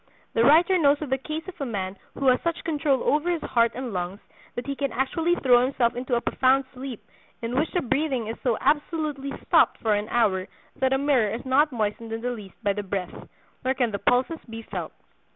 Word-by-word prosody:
The 225 - +3
writer 340 +7 +5
knows 290 -2 +4
of 280 - -7
the 265 - +3
case 310 +5 -5
of 370 -5 -9
a - - 0
man 195 -4 -3 0.2
who 275 - -3
has 250 - +3
such 335 0 -2
control 295 -4 +1
over 300 +4 +2
his 340 -3 -1
heart 235 -2 +2
and 250 -3 -4
lungs 180 +2 -3 0.4
that 245 - -4
he 280 0 -3
can 275 -2 -2
actually 320 +8 +1
throw 250 -6 +5
himself 250 -2 +1
into 245 0 -1
a 235 - +1
profound 265 +2 +2
sleep 260 -3 -7 0.4
in 230 +2 -2
which 300 +5 +1
the 355 - 0
breathing 270 -2 0
is 225 +1 -4
so 240 -4 +1
absolutely 295 -1 0
stopped - - +4
for 220 -2 +1
an 205 +1 -1
hour 190 -6 +1 0.3
that 265 0 +1
a - - +3
mirror 270 -6 +2
is 230 +4 -5
not 285 +4 +3
moistened 225 0 -2
in 225 - -4
the 245 +1 -1
least 210 -5 -8
by 200 -2 +2
the 205 - -3
breath, 190 -2 -4 0.5
nor 260 +1 +1
can 245 -4 +1
the 200 - -3
pulses 255 +9 +1
be 225 0 -7
felt. - - -5
255 Hz, 225 wpm, -25 LUFS, 225-290 Hz, 0.5 s, writer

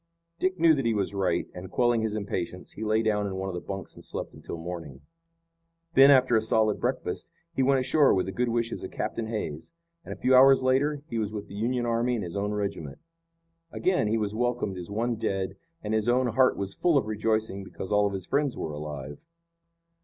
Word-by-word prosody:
Dick 185 0 0
knew 165 -1 +6
that 135 -5 0
he 115 - +1
was 100 -1 -1
right, 95 -2 0
and, 90 +1 -8
quelling 120 -2 +2
his 110 -1 -1
impatience, 90 -3 -4
he 110 - -7
lay 110 +1 +2
down 105 -2 +1
in 95 - -4
one 95 0 -3
of - - -5
the 90 - -4
bunks 95 -1 -6
and - - -13
slept - - -5
until - - -8
morning. 80 -5 -7 0.9
Then, 135 -1 +8
after 130 -3 +5
a 110 - +4
solid 110 -1 +2
breakfast, - - -2 0.2
he 135 - 0
went 135 0 +3
ashore 140 +2 +4
with 95 - +2
the 95 - -4
good 120 +5 0
wishes 115 0 -1
of - - -5
Captain 115 - -3
Hays, 105 - -5 0.3
and, - - -9
a - - -5
few 130 +1 +3
hours 135 +1 +7
later, 140 +3 +1
he 115 -7 -3
was 110 0 -2
with 105 -1 -5
the - - -12
Union 120 +4 -1
army 120 +1 +1
and 110 - -3
his 85 0 -6
own 100 +1 -1
regiment. 100 -8 -4 0.7
Again 180 - +1
he 110 +2 +1
was 105 -2 -1
welcomed 120 -5 -1
as 90 - -6
one 115 +3 -1
dead 95 -3 -2 0.3
and 105 0 -2
his 110 +1 +1
own 125 0 +3
heart 130 +3 +3
was 100 0 -3
full 170 -4 +2
of 135 - +1
rejoicing 110 -2 -1
because 95 0 -8
all 105 0 +4
of 100 - -4
his 95 -2 -5
friends 140 -2 0
were 80 - -3
alive. 75 - -7
110 Hz, 220 wpm, -27 LUFS, 95-125 Hz, 0.9 s, Then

